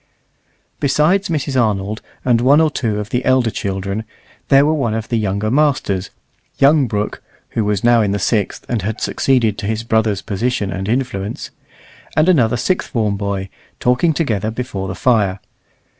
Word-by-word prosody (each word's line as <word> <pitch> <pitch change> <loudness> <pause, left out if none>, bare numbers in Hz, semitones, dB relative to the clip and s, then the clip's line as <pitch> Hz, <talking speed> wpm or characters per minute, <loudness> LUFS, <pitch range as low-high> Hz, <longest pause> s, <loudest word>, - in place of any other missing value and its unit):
Besides 155 +8 +2
Mrs. 140 -5 0
Arnold 105 -1 -1 0.2
and 120 -2 +3
one 140 +4 +5
or 160 -1 +3
two 110 -7 -1
of 105 0 -6
the 125 +1 0
elder 130 -3 +2
children, 100 +2 -3 0.4
there 135 +1 +5
were 155 - +2
one 120 -8 0
of 110 -1 -4
the 115 - +1
younger 105 0 -1
masters, 130 -10 +1 0.5
young 140 -1 +4
Brooke 105 -1 -3 0.3
(who 115 - -1
was 105 -1 -1
now 120 -1 +5
in 105 - +1
the 100 - 0
sixth, 100 +1 -1
and 120 -4 -1
had 110 +4 -3
succeeded 120 -5 +1
to 100 - -4
his 110 +1 -2
brother's 110 -3 +1
position 105 0 -1
and 95 +2 -4
influence), 115 -5 -2 0.7
and 155 +2 +4
another 120 -10 +3
sixth 185 +10 -1
form 110 -6 0
boy, 100 -1 -3 0.3
talking 125 +7 +2
together 110 - -1
before 110 -5 -4
the 95 - -4
fire. 100 -5 +2
115 Hz, 170 wpm, -18 LUFS, 100-130 Hz, 0.7 s, one